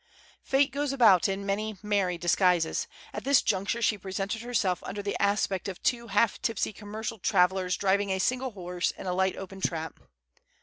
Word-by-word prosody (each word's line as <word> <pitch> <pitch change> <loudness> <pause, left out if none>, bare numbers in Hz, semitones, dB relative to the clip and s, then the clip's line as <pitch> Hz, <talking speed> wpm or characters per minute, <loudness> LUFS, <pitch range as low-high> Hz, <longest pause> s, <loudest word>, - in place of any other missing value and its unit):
Fate 275 +1 +2
goes 285 0 -1
about 215 -10 +5
in 195 +1 -3
many 210 +1 -2
merry 200 -4 0
disguises. 175 -1 +2 0.3
At - - -5
this 280 -1 +4
juncture 210 +3 0
she 210 -2 +2
presented 195 +3 -3
herself 220 -7 0
under 205 +1 -5
the 200 - -2
aspect 200 -2 +1
of 190 -2 -6
two 240 -2 0
half 205 +1 +1
tipsy 225 -1 -1
commercial 215 +2 -6
travellers 185 -1 +2
driving 200 +1 +1
a 190 - 0
single 255 +7 0
horse 180 -2 -2
in - - -8
a 180 - -1
light 190 +1 +1
open 195 0 -8
trap. 160 -3 -3
200 Hz, 175 wpm, -28 LUFS, 185-220 Hz, 0.3 s, about